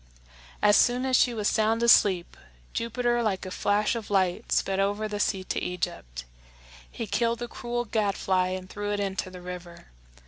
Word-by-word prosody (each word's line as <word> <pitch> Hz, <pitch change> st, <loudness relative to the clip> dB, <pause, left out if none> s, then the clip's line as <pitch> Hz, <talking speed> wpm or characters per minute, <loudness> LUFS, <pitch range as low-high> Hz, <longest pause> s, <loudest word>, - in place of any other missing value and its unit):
As 205 Hz, 0 st, +6 dB
soon 245 Hz, +1 st, +3 dB
as 260 Hz, -1 st, +2 dB
she 250 Hz, -, +4 dB
was 215 Hz, -3 st, -1 dB
sound 220 Hz, +2 st, +1 dB
asleep, 195 Hz, -6 st, +4 dB, 0.4 s
Jupiter 240 Hz, +1 st, 0 dB
like 200 Hz, -4 st, -1 dB
a 185 Hz, -, -6 dB
flash 205 Hz, +3 st, +1 dB
of 230 Hz, -3 st, -5 dB
light 190 Hz, -3 st, 0 dB
sped 195 Hz, 0 st, +1 dB
over 205 Hz, +2 st, 0 dB
the 205 Hz, -1 st, -4 dB
sea 195 Hz, -2 st, 0 dB
to -, -, -3 dB
Egypt. 60 Hz, -, -4 dB, 0.7 s
He 230 Hz, -, -5 dB
killed 230 Hz, +3 st, 0 dB
the 240 Hz, +1 st, -5 dB
cruel 240 Hz, 0 st, -4 dB
gadfly 195 Hz, -4 st, 0 dB
and 185 Hz, 0 st, -5 dB
threw 205 Hz, +2 st, -4 dB
it 205 Hz, -, -2 dB
into 195 Hz, -2 st, -2 dB
the 180 Hz, -1 st, -11 dB
river. 180 Hz, -, -9 dB
205 Hz, 175 wpm, -27 LUFS, 185-230 Hz, 0.7 s, As